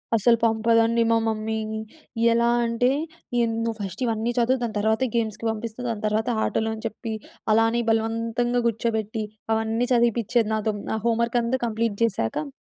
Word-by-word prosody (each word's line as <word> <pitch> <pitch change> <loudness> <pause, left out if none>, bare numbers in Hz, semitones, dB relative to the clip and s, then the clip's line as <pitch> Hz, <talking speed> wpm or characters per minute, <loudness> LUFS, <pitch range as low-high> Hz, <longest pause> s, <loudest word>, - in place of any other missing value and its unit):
అసలు 230 +2 +4
పంపదండి 230 +1 +3
మా 230 - +4
మమ్మీ. 220 0 -1 0.8
ఎలా 235 0 +3 0.2
అంటే 230 +2 +2 0.5
ఎంద్ 225 -1 -1
"నువ్వు 225 -1 -2
ఫస్ట్ 195 +4 -5
ఇవన్నీ 225 +1 0
చదువు 245 +2 +2
దాని 225 -2 -3
తర్వాత 220 +3 +1
గేమ్స్‌కి 225 -1 -1
పంపిస్తా, 225 +2 -6
దాని 215 -2 -4
తర్వాత 220 +3 0 0.2
ఆటలని 220 0 -2
చెప్పి" 220 0 -6 0.4
అలానే 225 +2 +3
బలవంతంగా 230 +2 0
కూర్చోబెట్టి 220 -1 -1 0.3
అవన్నీ 225 +2 0
చదివిపిచేది 235 -1 +2
నాతో. 215 0 0 0.2
నా 220 - 0
హోమ్ 230 0 +2
వర్కం‌తా 240 +2 0
కంప్లీట్ 225 -1 -1
చేసాక 150 - -1
225 Hz, 145 wpm, -24 LUFS, 220-235 Hz, 0.8 s, అసలు